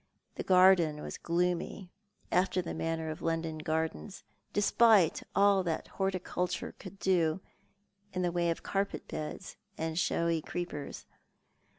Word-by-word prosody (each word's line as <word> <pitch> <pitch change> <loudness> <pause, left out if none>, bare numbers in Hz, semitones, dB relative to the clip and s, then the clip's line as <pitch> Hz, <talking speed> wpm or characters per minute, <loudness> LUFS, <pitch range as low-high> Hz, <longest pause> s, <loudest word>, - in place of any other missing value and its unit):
The - - -5
garden 180 -5 +5
was - - -6
gloomy, 180 +2 -1 0.4
after 185 +1 +2
the 175 - -3
manner 160 -1 -2
of 155 - -8
London 165 -1 -2
gardens, 155 - -3 0.3
despite 205 -3 +4
all 200 -1 +5
that 170 -3 -3
horticulture 185 -2 -2
could 195 0 -10
do 175 -3 +2 0.7
in 185 -1 -2
the 175 - +1
way 170 0 +1
of 165 - -2
carpet 200 0 -2
beds 155 +4 -6 0.2
and 160 +1 -2
showy 170 -2 +1
creepers. 175 -4 -5
175 Hz, 125 wpm, -31 LUFS, 160-185 Hz, 0.7 s, garden